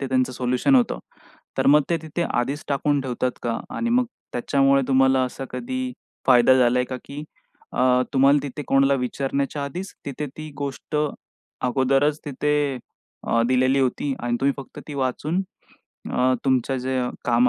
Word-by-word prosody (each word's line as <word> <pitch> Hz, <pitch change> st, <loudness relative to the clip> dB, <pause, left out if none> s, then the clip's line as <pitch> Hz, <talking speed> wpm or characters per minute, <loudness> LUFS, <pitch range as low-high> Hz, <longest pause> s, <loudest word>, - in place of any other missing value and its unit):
ते 135 Hz, -, -2 dB
त्यांचं 130 Hz, 0 st, +1 dB
सोल्युशन 125 Hz, -, +1 dB
होतं? 245 Hz, -4 st, +3 dB, 0.6 s
तर -, -, +2 dB
मग 150 Hz, +2 st, +6 dB
ते 170 Hz, -, +3 dB
तिथे 160 Hz, +2 st, -3 dB
आधीच 140 Hz, 0 st, -1 dB
टाकून 145 Hz, +1 st, +1 dB
ठेवतात 130 Hz, -1 st, -1 dB
का? 115 Hz, -1 st, -1 dB, 0.2 s
आणि 235 Hz, -, -1 dB
मग 250 Hz, +1 st, +3 dB, 0.3 s
त्याच्यामुळे 135 Hz, +2 st, +3 dB
तुम्हाला 130 Hz, 0 st, +4 dB
असा 130 Hz, +1 st, -5 dB
कधी 255 Hz, +1 st, -3 dB, 0.3 s
फायदा 125 Hz, 0 st, +6 dB
झालाय 125 Hz, 0 st, +3 dB
का, 130 Hz, +1 st, -5 dB
की 145 Hz, +1 st, -7 dB, 0.5 s
अ, 125 Hz, 0 st, +3 dB
तुम्हाला 140 Hz, +2 st, +5 dB
तिथे 145 Hz, +1 st, -5 dB
कोणाला 135 Hz, 0 st, +4 dB
विचारण्याच्या 140 Hz, +3 st, -2 dB
आधीच 180 Hz, +8 st, -6 dB
तिथे 140 Hz, +2 st, -4 dB
ती 155 Hz, 0 st, -7 dB
गोष्ट 140 Hz, +2 st, -4 dB, 0.7 s
अगोदरच 135 Hz, +4 st, +2 dB
तिथे 145 Hz, -1 st, 0 dB, 0.5 s
अ, 115 Hz, -, +3 dB
दिलेली 130 Hz, +1 st, +3 dB
होती 135 Hz, +2 st, 0 dB
आणि 120 Hz, 0 st, 0 dB
तुम्ही 140 Hz, +1 st, +3 dB
फक्त 135 Hz, -, -10 dB
ती 150 Hz, -, -6 dB
वाचून 140 Hz, +7 st, -1 dB, 0.7 s
अ, 130 Hz, +1 st, +3 dB
तुमचं 130 Hz, 0 st, +1 dB
जे 130 Hz, +1 st, -1 dB, 0.2 s
काम 120 Hz, +1 st, +4 dB
135 Hz, 155 wpm, -23 LUFS, 130-145 Hz, 0.7 s, मग